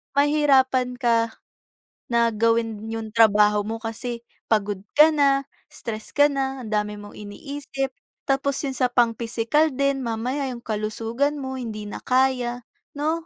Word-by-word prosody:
mahihirapan 270 Hz, -4 st, +3 dB
ka 230 Hz, -2 st, +1 dB, 0.7 s
na 235 Hz, -1 st, +2 dB
gawin 225 Hz, 0 st, 0 dB
yung 225 Hz, -1 st, -5 dB
trabaho 210 Hz, -2 st, +5 dB
mo 220 Hz, +2 st, -3 dB
kasi 230 Hz, +1 st, -5 dB, 0.2 s
pagod 205 Hz, -3 st, +1 dB, 0.2 s
ka 310 Hz, +1 st, +8 dB
na, 275 Hz, -2 st, +3 dB, 0.2 s
stress 220 Hz, -2 st, -7 dB
ka 290 Hz, 0 st, +5 dB
na, 270 Hz, -2 st, -2 dB
ang 215 Hz, -, -8 dB
dami 210 Hz, 0 st, 0 dB
mong 205 Hz, 0 st, -10 dB
iniisip, 270 Hz, +5 st, -5 dB, 0.3 s
tapos 275 Hz, 0 st, 0 dB
yun 275 Hz, -, -1 dB
sa 255 Hz, -1 st, +1 dB
pang 240 Hz, -1 st, +3 dB
physical 235 Hz, +7 st, +1 dB
din 275 Hz, 0 st, 0 dB
mamaya 250 Hz, +4 st, -2 dB
yung 240 Hz, -2 st, -7 dB
kalusugan 225 Hz, +6 st, -1 dB
mo 265 Hz, -2 st, -5 dB
hindi 215 Hz, -3 st, -5 dB
na 205 Hz, -, -7 dB
kaya, 250 Hz, -2 st, +1 dB, 0.3 s
no? 300 Hz, +2 st, +1 dB
240 Hz, 145 wpm, -24 LUFS, 225-270 Hz, 0.7 s, ka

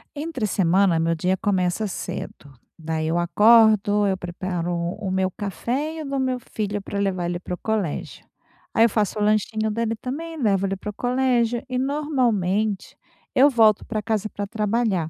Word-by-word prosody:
Entre 290 Hz, -6 st, -3 dB
semana, 185 Hz, -2 st, +2 dB
meu 165 Hz, 0 st, +1 dB
dia 185 Hz, +3 st, 0 dB
começa 190 Hz, +1 st, 0 dB
cedo. 145 Hz, -5 st, -7 dB, 0.2 s
Daí 160 Hz, -1 st, -3 dB
eu 165 Hz, +2 st, 0 dB
acordo, 210 Hz, +2 st, +5 dB
eu 190 Hz, -1 st, +1 dB
preparo 175 Hz, -1 st, -4 dB, 0.3 s
o 195 Hz, -, -3 dB
meu 190 Hz, 0 st, 0 dB
café 245 Hz, -, -3 dB
e 320 Hz, -, -5 dB
o -, -, -6 dB
do 275 Hz, 0 st, -2 dB
meu 260 Hz, -1 st, 0 dB
filho 205 Hz, -1 st, -2 dB
pra 200 Hz, +1 st, -5 dB
levar 185 Hz, -3 st, -1 dB
ele 175 Hz, 0 st, -3 dB
para 180 Hz, -, -6 dB
o -, -, -3 dB
colégio, 210 Hz, -8 st, -3 dB, 0.5 s
aí 225 Hz, -, +5 dB
eu -, -, +3 dB
faço 210 Hz, 0 st, -1 dB
o -, -, -1 dB
lanchinho 215 Hz, +1 st, +1 dB
dele 225 Hz, +1 st, -1 dB
também, 310 Hz, +6 st, -6 dB
levo 195 Hz, -3 st, +2 dB
ele 195 Hz, -, -1 dB
para 205 Hz, +2 st, -7 dB
o -, -, -5 dB
colégio 245 Hz, -1 st, +1 dB
e 255 Hz, -, -2 dB
normalmente 235 Hz, -, 0 dB, 0.4 s
eu 275 Hz, +3 st, +7 dB
volto 220 Hz, -5 st, +4 dB
pra 215 Hz, -2 st, -3 dB
casa 215 Hz, -1 st, -1 dB
pra 205 Hz, -, -4 dB
trabalhar. 210 Hz, -5 st, 0 dB
210 Hz, 180 wpm, -23 LUFS, 185-235 Hz, 0.5 s, eu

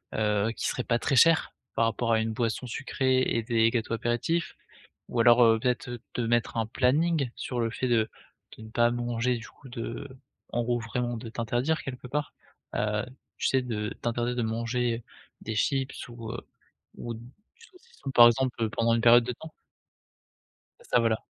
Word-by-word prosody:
heu, 105 Hz, 0 st, +1 dB
qui -, -, -3 dB
serait 125 Hz, -, -2 dB
pas 120 Hz, -, +1 dB
très 135 Hz, +3 st, 0 dB
cher 165 Hz, +5 st, +5 dB, 0.2 s
par 115 Hz, -, +3 dB
rapport 115 Hz, +1 st, 0 dB
à 110 Hz, -, +4 dB
une 110 Hz, 0 st, -1 dB
boisson 115 Hz, +2 st, -1 dB
sucrée 130 Hz, +1 st, 0 dB
et 115 Hz, -3 st, 0 dB
des 115 Hz, -1 st, +3 dB
gâteaux 115 Hz, -1 st, -2 dB
apéritifs, 120 Hz, +9 st, -1 dB, 0.5 s
ou -, -, -2 dB
alors, 120 Hz, +1 st, +7 dB
heu, 115 Hz, -1 st, +5 dB
peut-être 125 Hz, 0 st, -2 dB
te -, -, -1 dB
mettre 115 Hz, 0 st, 0 dB
un 110 Hz, -, +1 dB
planning 135 Hz, +4 st, +1 dB
sur 125 Hz, -2 st, -4 dB
le 115 Hz, -, +1 dB
fait 125 Hz, +3 st, -2 dB
de 115 Hz, -2 st, +2 dB, 0.5 s
de -, -, -11 dB
ne 110 Hz, -, -10 dB
pas 120 Hz, +1 st, +3 dB
manger 120 Hz, 0 st, 0 dB
du 110 Hz, -, -9 dB
coup 135 Hz, -, -16 dB
de 120 Hz, +3 st, -5 dB, 0.4 s
en 120 Hz, -, -1 dB
gros, 120 Hz, 0 st, 0 dB
vraiment, 120 Hz, +1 st, -2 dB
de 115 Hz, 0 st, -7 dB
t'interdire 120 Hz, +7 st, -1 dB
quelque 125 Hz, -2 st, -7 dB
part, 145 Hz, +3 st, -3 dB, 0.4 s
heu, 105 Hz, +2 st, 0 dB, 0.3 s
tu -, -, -3 dB
sais? 130 Hz, -, +3 dB
De 105 Hz, -4 st, -3 dB
t'interdire 120 Hz, +1 st, -1 dB
de 120 Hz, -, 0 dB
manger 115 Hz, +1 st, -1 dB, 0.4 s
des 110 Hz, -, -4 dB
chips 135 Hz, +4 st, -1 dB
ou 115 Hz, -2 st, -7 dB
heu, 120 Hz, -, -5 dB, 0.6 s
ou 120 Hz, -, -5 dB
du 115 Hz, -, -10 dB, 0.4 s
saucisson, 460 Hz, -, -12 dB
par 120 Hz, -2 st, +9 dB
exemple, 120 Hz, -2 st, +1 dB
pendant 115 Hz, +2 st, +2 dB
une 115 Hz, -, 0 dB
période 120 Hz, 0 st, +7 dB
de 125 Hz, -, -2 dB
temps? 160 Hz, +6 st, -11 dB, 1.3 s
C'est -, -, -19 dB
ça, 125 Hz, -, +4 dB
voilà. 115 Hz, -1 st, +2 dB
120 Hz, 185 wpm, -28 LUFS, 115-125 Hz, 1.3 s, par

